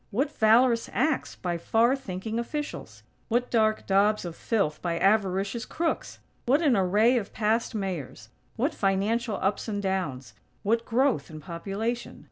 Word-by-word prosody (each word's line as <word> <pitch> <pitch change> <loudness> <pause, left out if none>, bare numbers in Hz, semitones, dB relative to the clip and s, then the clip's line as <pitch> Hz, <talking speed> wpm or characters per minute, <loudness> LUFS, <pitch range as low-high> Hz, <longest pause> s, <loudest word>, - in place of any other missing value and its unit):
What 270 +8 0
valorous 230 +2 +4
acts 315 - 0
by 175 -2 -3
far 230 +8 +3
thinking 220 -3 -4
officials! 295 +5 -5 0.2
What 240 +2 0
dark 215 -2 +2
daubs 200 +1 +2
of 170 -1 -6
filth 170 -10 -1
by 170 -1 -1
avaricious 195 +3 +1
crooks! 330 0 -3 0.3
What 280 +7 +3
an 280 -6 +4
array 210 +6 +3
of 200 - -8
past 225 +2 0
Mayors; 170 - -5 0.3
what 275 +7 0
financial 210 +4 0
ups 200 +4 0
and 205 -2 -2
downs; 185 -10 -3 0.3
what 230 +3 +1
growth 245 - +1
in 155 -1 -8
population. 195 +8 -4
215 Hz, 145 wpm, -27 LUFS, 190-235 Hz, 0.3 s, valorous